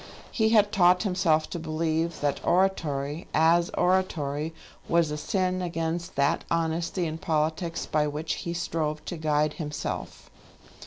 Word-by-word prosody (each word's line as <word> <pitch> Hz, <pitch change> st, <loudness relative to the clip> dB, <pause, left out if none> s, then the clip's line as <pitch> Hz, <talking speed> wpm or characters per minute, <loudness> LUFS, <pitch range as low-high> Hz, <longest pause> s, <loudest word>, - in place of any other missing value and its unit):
He 220 Hz, -1 st, +2 dB
had 210 Hz, -2 st, +4 dB
taught 180 Hz, -2 st, +4 dB
himself 175 Hz, -6 st, +2 dB
to 175 Hz, -, -3 dB
believe 160 Hz, +1 st, -1 dB
that 145 Hz, -1 st, -1 dB
oratory, 160 Hz, -5 st, 0 dB
as 170 Hz, +2 st, +4 dB
oratory, 160 Hz, -5 st, +1 dB, 0.4 s
was 165 Hz, -2 st, +3 dB
a -, -, -2 dB
sin 185 Hz, +2 st, -1 dB
against 170 Hz, 0 st, -3 dB
that 140 Hz, +1 st, +2 dB
honesty 170 Hz, +2 st, 0 dB
in 160 Hz, 0 st, -4 dB
politics 160 Hz, +2 st, -1 dB
by 150 Hz, -1 st, +1 dB
which 150 Hz, +2 st, -3 dB
he 170 Hz, -, -3 dB
strove 155 Hz, -3 st, -2 dB
to 175 Hz, -, -4 dB
guide 150 Hz, -1 st, +1 dB
himself. 150 Hz, -3 st, -5 dB
165 Hz, 140 wpm, -27 LUFS, 155-175 Hz, 0.4 s, had